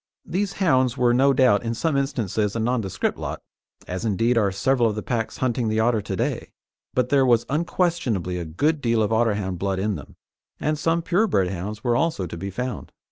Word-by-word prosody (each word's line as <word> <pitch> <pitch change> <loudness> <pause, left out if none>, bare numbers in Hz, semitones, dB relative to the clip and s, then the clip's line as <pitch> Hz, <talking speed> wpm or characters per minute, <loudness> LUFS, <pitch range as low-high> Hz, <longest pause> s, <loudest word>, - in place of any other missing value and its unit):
These 195 +2 -1
hounds 130 - +2
were 120 -2 +3
no 135 +3 +4
doubt 125 -6 +4
in 115 0 -3
some 160 +5 0
instances 110 -6 -1
a - - -1
nondescript 115 -4 -1
lot, - - -4 0.5
as, 90 +3 -4
indeed, 115 +3 +1
are 105 -4 +2
several 120 +4 +2
of 105 - -3
the 105 - -4
packs 115 -2 -2
hunting 120 -2 0
the 110 0 0
otter 115 -1 +2
to - - -4
day, - - -2 0.5
but 125 -1 +1
there 140 -2 +4
was 120 -3 +3
unquestionably 145 - 0
a 85 - -4
good 145 - 0
deal 115 -3 +2
of 105 - -1
Otterhound 105 -5 0
blood 95 0 -1
in 105 +2 0
them, - - -9 0.4
and 155 +1 -1
some 165 +2 +1
pure 190 +7 +2
bred 95 - +1
hounds 100 +4 -5
were 120 -2 +2
also 155 - 0
to 85 - -7
be 95 +4 -5
found. 125 +6 -5
115 Hz, 205 wpm, -23 LUFS, 100-135 Hz, 0.5 s, no